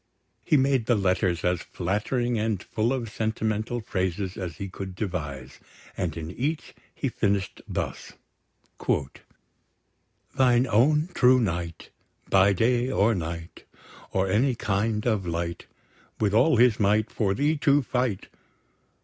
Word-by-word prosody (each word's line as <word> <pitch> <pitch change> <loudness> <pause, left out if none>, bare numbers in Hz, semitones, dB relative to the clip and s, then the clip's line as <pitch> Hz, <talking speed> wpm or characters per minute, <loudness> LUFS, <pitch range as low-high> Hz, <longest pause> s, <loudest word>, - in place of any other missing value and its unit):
He 150 - +3
made 135 -3 +2
the 120 - +4
letters 95 -3 +1
as 90 -1 +1
flattering 110 +6 -1
and 105 -3 -1
full 110 +3 -1
of 130 -3 -2
sentimental 110 +1 -2
phrases 95 -2 -2
as 90 -5 -6
he 100 - -5
could 95 0 -7
devise; 75 - -5 0.4
and 85 -3 -3
in 80 +1 -5
each 145 - -3 0.2
he 140 - -2
finished 100 -5 -1
thus: - - -4 2.2
"Thine 125 -1 +4
own 145 - +3
true 130 -3 +5
knight, 85 -6 -3 0.4
By 100 +1 +5
day 120 +5 +2
or 115 -3 +3
night. 85 -2 -6 0.5
Or 95 0 +1
any 120 +7 +2
kind 105 +1 -1
of 105 -6 0
light, 85 0 -3 0.5
With 105 -2 +1
all 130 +7 +4
his 120 -1 +4
might, 105 +1 +2
For 100 -3 0
thee 145 +4 +2
to 145 0 +3
fight. 125 -5 -1
105 Hz, 130 wpm, -26 LUFS, 95-120 Hz, 2.2 s, true